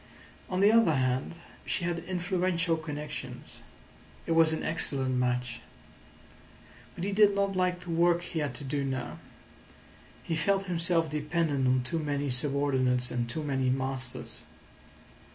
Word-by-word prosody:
On 185 0 0
the 205 +2 +7
other 225 -9 +5
hand, 130 +3 0 0.3
she 180 - -1
had 170 0 -1
influential 180 -2 0
connections. 150 -2 -7 0.7
It - - -3
was 165 -1 +5
an 160 - -2
excellent 135 -4 -1
match. 125 -1 -1 1.3
But 170 - -5
he 200 - -1
did 205 0 +5
not 200 -1 +1
like 180 -1 +1
the 180 -1 -6
work 170 +1 +3
he 170 -2 -3
had 145 -5 -2
to 145 - -5
do 140 +1 -1
now. 130 -2 -3 1.0
He 165 - -2
felt 195 +5 +1
himself 170 -2 +1
dependent 150 -2 0
on 130 0 +3
too 165 +6 -2
many 145 -2 -1
subordinates 130 -2 +1
and 120 -1 -2
too 155 +6 -3
many 135 -3 0
masters. 130 -1 -3
155 Hz, 145 wpm, -29 LUFS, 130-175 Hz, 1.3 s, the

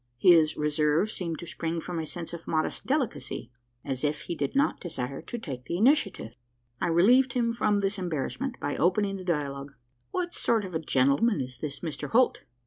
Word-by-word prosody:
His 160 +1 +5
reserve 150 +6 +2
seemed 170 -5 -3
to 170 - -8
spring 165 0 -3
from 175 0 -4
a 160 - -4
sense 170 +1 -6
of 170 -1 -8
modest 155 -1 -1
delicacy 270 - -2 0.3
as 135 -1 -3
if 150 0 0
he - - -4
did 140 - -3
not 280 +3 +2
desire 140 -6 -5
to 240 - -6
take 130 - -7
the 170 - -2
initiative. 205 - +2 0.5
I - - +1
relieved 240 +10 +5
him 235 -2 +1
from 210 -3 +1
this 195 0 0
embarrassment, 180 - -3
by 145 - -2
opening 195 +3 +2
the 185 - -8
dialogue: 140 -5 -2 0.3
"What 355 -1 -2
sort 225 -3 +1
of 185 - -8
a 160 - 0
gentleman 140 - +2
is 125 -2 -5
this 145 -1 -5
Mr 155 -5 -4
Holt?" 250 +2 +3
170 Hz, 190 wpm, -28 LUFS, 150-210 Hz, 0.5 s, His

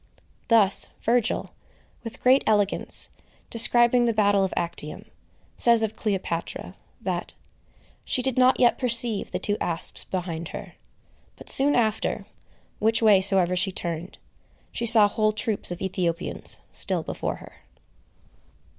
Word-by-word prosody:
Thus 210 -4 +3
Virgil, 235 -1 0 0.5
with 230 -1 -9
great 260 +2 +4
elegance, 205 -2 0 0.4
describing 240 +1 +3
the 230 - +1
battle 205 -2 +2
of 190 - -2
Actium, 160 -3 -4 0.5
says 235 -2 +3
of 220 -1 -3
Cleopatra, 190 -5 -4 0.3
that - - -4 0.7
"she 255 - -2
did 265 -1 -1
not 255 0 +3
yet 240 -2 +3
perceive 235 -3 +3
the - - -3
two 205 0 -2
asps 170 -1 -2
behind 170 -3 -5
her;" 200 -1 -9 0.6
but - - -3
soon 285 +2 +5
after, 220 -3 -1 0.5
which 225 +1 +1
way 205 -3 +5
soever 185 -2 +2
she 185 +2 +2
turned, 170 -1 -6 0.5
she 235 - -3
saw 220 -3 +6
whole 215 +1 0
troops 215 0 -3
of 175 +1 -5
Ethiopians 175 -2 0
still - - +2
before - - -4
her. - - -15
210 Hz, 130 wpm, -24 LUFS, 185-235 Hz, 0.7 s, saw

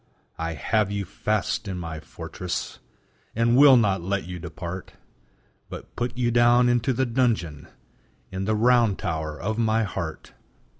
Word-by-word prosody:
I 80 0 -2
have 105 +4 +1
you 100 -1 -3
fast 105 +2 -2
in 95 -2 -4
my 80 -2 -5
fortress, 80 +3 -6 0.6
And 115 +1 +3
will 135 -1 +8
not 100 -6 +2
let 95 +3 -1
you 90 0 -7
depart, 85 +2 -7 0.8
But - - -10
put 120 0 -3
you 120 -1 +1
down 120 +1 +5
into 120 +1 +2
the 130 +1 +1
dungeon 115 - -1 0.6
In 95 +1 -3
the 110 +1 +1
round 115 -2 +3
tower 80 -2 -3
of 110 +5 -2
my 110 0 +2
heart. 90 -6 -5
100 Hz, 150 wpm, -25 LUFS, 85-120 Hz, 0.8 s, will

